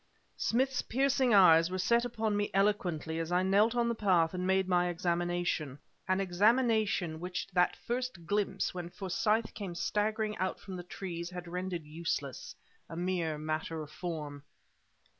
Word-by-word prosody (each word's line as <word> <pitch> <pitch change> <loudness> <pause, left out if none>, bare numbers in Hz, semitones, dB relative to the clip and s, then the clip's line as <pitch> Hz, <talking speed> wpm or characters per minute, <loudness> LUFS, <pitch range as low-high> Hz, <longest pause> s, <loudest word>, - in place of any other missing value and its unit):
Smith's 260 +2 +1
piercing 265 0 +1
eyes 165 -5 +7
were 185 - -3
set 235 +6 +3
upon 220 -3 -1
me 205 0 0
eloquently 180 -6 0
as 165 +1 -3
I 180 +1 +3
knelt 205 +5 +3
on 240 -1 +2
the 235 - +1
path 185 -7 +2
and 180 0 -2
made 190 0 +2
my 180 -1 +2
examination 175 -4 -1 0.3
an 185 +1 +2
examination 205 -3 +2
which 180 +1 -4
that 180 -1 +3
first 245 -8 -3
glimpse 200 0 0
when 175 -1 -5
Forsyth 210 +4 0
came 190 -5 -6
staggering 215 +3 -1
out 185 +1 -2
from 190 - -8
the 180 - -5
trees 175 -1 -6
had 180 -1 -7
rendered 180 -1 -4
useless 150 -4 -4 0.3
a - - -7
mere 175 -3 -1
matter 155 +1 -3
of 150 - -12
form. 150 -5 -5
185 Hz, 160 wpm, -31 LUFS, 170-210 Hz, 0.3 s, eyes